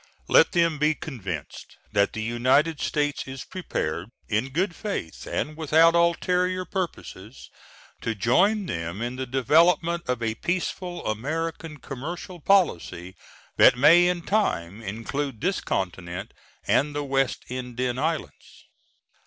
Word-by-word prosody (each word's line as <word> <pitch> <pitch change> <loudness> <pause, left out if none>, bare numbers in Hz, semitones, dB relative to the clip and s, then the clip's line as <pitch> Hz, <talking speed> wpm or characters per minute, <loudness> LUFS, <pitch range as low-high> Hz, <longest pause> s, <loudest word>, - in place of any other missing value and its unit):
Let - - +5
them 165 -4 +2
be 150 +1 +3
convinced 95 - -7
that 100 -1 +2
the 110 - -3
United 130 +7 +2
States 145 -2 -1
is 130 -1 -6
prepared, 90 - -4 0.2
in 115 +5 0
good 175 +5 -1
faith 200 - -5
and 155 - -2
without 160 +1 +4
ulterior 180 +2 +1
purposes, 135 - -6 0.5
to 115 - -2
join 190 - +2
them 85 - -4
in 120 +1 -3
the 130 0 -4
development 165 +7 +3
of 125 -2 -1
a 110 -1 0
peaceful 175 +5 -3
American 155 +7 -3
commercial 170 +7 -7
policy 95 - +1 0.4
that - - +7
may 165 +7 +7
in 180 -1 -1
time 105 - -1
include 115 +5 -4
this 185 +5 0
continent 90 -1 -4 0.3
and 145 +1 +2
the 145 - -1
West 135 -1 0
Indian 125 0 -3
Islands. 160 +1 -4
145 Hz, 130 wpm, -25 LUFS, 115-170 Hz, 0.5 s, that